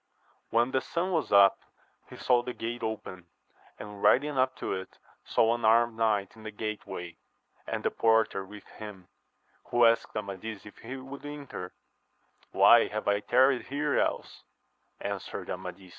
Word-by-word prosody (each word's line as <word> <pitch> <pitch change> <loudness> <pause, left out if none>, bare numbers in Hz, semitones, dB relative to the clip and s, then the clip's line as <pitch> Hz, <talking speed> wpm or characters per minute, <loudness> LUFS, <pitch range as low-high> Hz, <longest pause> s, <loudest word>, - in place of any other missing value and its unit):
When 120 +3 +2
the 130 - +1
sun 175 +6 -2
was 160 -6 -1
up 100 -1 +6 0.5
he - - -10
saw 125 -1 +3
the 125 0 -6
gate 120 +2 -5
open, 95 -5 -5 0.5
and 105 -1 -9
riding 145 +2 +3
up 130 0 +1
to - - -3
it 95 0 -7 0.3
saw 115 +1 +2
an 120 0 -4
armed 115 +1 +4
knight 110 -3 0
in 110 - -14
the 110 - -6
gateway, 105 -5 -6 0.5
and - - -3
the - - +1
porter 110 -3 +2
with 105 +2 -12
him, 100 -4 -11 0.6
who 120 0 +3
asked 115 0 +2
Amadis 100 0 -6
if 105 - -13
he 125 +4 -7
would 135 +1 -10
enter 145 -11 -7 0.8
1 - - -9
Why 120 -1 +7
have 110 0 -5
I 100 0 +3
tarried 130 +4 +3
here 145 +1 0
else - - -2 0.6
1 - - -3
answered - - -6
Amadis. 95 -2 -7
115 Hz, 165 wpm, -29 LUFS, 100-125 Hz, 0.8 s, Why